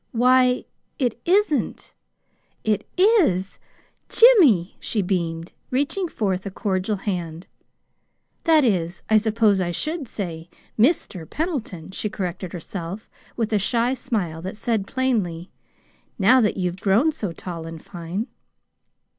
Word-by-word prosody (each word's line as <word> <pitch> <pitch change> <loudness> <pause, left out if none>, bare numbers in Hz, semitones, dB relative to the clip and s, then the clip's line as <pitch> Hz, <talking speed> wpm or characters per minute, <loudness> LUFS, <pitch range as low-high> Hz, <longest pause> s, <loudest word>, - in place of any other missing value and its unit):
"Why, 250 +1 +4 0.3
it 245 -4 -1
isn't 370 -4 +1 0.7
it 215 -1 0
IS 345 - +3 0.5
Jimmy!" 315 - +6
she 210 -3 -1
beamed, 170 -2 -2 0.2
reaching 290 +9 0
forth 190 - -2
a 200 - -4
cordial 195 +1 -1
hand. 175 -4 -4 1.0
"That 315 -2 +5
is, 180 -7 0
I 220 - +7
suppose 215 -2 +2
I 175 - -1
should 305 - -3
say 170 -6 -6 0.3
'MR. 215 - +1
PENDLETON,'" 240 - -4
she 210 - -3
corrected 185 -3 -4
herself 180 +3 -7 0.3
with 225 -2 -1
a 210 - +3
shy 235 +5 +1
smile 210 - -3
that 190 +4 -6
said 220 -4 -1
plainly: 205 -10 -1 0.7
"Now 250 +6 +5
that 210 - +1
you've 180 0 -2
grown 220 +11 +3
so 210 - -4
tall 165 -1 -7
and 165 0 -8
fine!" 175 +5 -5
205 Hz, 125 wpm, -23 LUFS, 180-250 Hz, 1.0 s, I